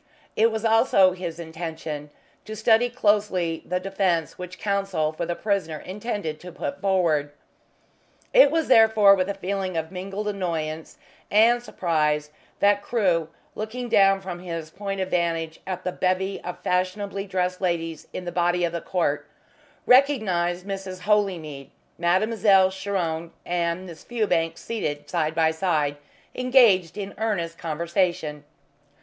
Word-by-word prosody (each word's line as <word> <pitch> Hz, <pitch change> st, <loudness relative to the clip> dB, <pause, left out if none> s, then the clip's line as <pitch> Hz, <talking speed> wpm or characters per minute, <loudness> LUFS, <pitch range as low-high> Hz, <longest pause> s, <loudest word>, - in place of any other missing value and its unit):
It 225 Hz, +1 st, +4 dB
was 220 Hz, 0 st, -3 dB
also 225 Hz, -4 st, +5 dB
his 180 Hz, -3 st, -5 dB
intention 160 Hz, -2 st, -6 dB, 0.4 s
to 215 Hz, -, -6 dB
study 225 Hz, +2 st, +3 dB
closely 205 Hz, -8 st, +1 dB
the 180 Hz, 0 st, -2 dB
defence 185 Hz, -4 st, 0 dB
which 180 Hz, 0 st, -8 dB
Counsel 195 Hz, -6 st, -1 dB
for 170 Hz, +1 st, -4 dB
the 175 Hz, -, -2 dB
prisoner 195 Hz, -7 st, -1 dB
intended 195 Hz, -4 st, -5 dB
to 180 Hz, +2 st, -10 dB
put 280 Hz, -, -5 dB
forward. 170 Hz, -7 st, +2 dB, 1.0 s
It -, -, +8 dB
was 325 Hz, +1 st, 0 dB
therefore 220 Hz, -4 st, +6 dB
with 190 Hz, 0 st, 0 dB
a 200 Hz, -, -2 dB
feeling 190 Hz, -2 st, -3 dB
of 160 Hz, +1 st, -3 dB
mingled 195 Hz, +3 st, -5 dB
annoyance 165 Hz, -6 st, -3 dB, 0.3 s
and 230 Hz, +3 st, +5 dB
surprise 150 Hz, -8 st, 0 dB, 0.3 s
that 205 Hz, 0 st, +4 dB
Crewe, 185 Hz, -8 st, +1 dB, 0.3 s
looking 235 Hz, +3 st, -5 dB
down 195 Hz, -2 st, +4 dB
from 185 Hz, -2 st, -6 dB
his 165 Hz, -3 st, -6 dB
point 195 Hz, +1 st, -4 dB
of 190 Hz, 0 st, -2 dB
vantage 165 Hz, -2 st, -1 dB
at 185 Hz, -1 st, -4 dB
the 180 Hz, -, -1 dB
bevy 185 Hz, +2 st, -1 dB
of 180 Hz, -, -5 dB
fashionably 195 Hz, +2 st, -1 dB
dressed 180 Hz, -1 st, -1 dB
ladies 165 Hz, -3 st, -2 dB
in 185 Hz, -, -6 dB
the 175 Hz, -, -3 dB
body 175 Hz, +1 st, +1 dB
of 170 Hz, -1 st, 0 dB
the 170 Hz, -, -3 dB
court, 165 Hz, -5 st, -1 dB, 0.6 s
recognised 195 Hz, -10 st, +3 dB
Mrs. 195 Hz, -2 st, -6 dB
Holymead, 180 Hz, -9 st, 0 dB, 0.3 s
Mademoiselle 190 Hz, +1 st, +3 dB
Chiron 180 Hz, -4 st, -3 dB, 0.2 s
and 175 Hz, +1 st, -1 dB
Miss 170 Hz, -3 st, -11 dB
Fewbanks 175 Hz, -9 st, -1 dB
seated 145 Hz, -10 st, -4 dB
side 155 Hz, 0 st, -1 dB
by 160 Hz, -1 st, +3 dB
side, 160 Hz, -4 st, 0 dB, 0.4 s
engaged 235 Hz, -10 st, +4 dB
in 200 Hz, -1 st, -5 dB
earnest 170 Hz, -7 st, -2 dB
conversation. 165 Hz, -2 st, -1 dB
185 Hz, 140 wpm, -24 LUFS, 165-200 Hz, 1.0 s, It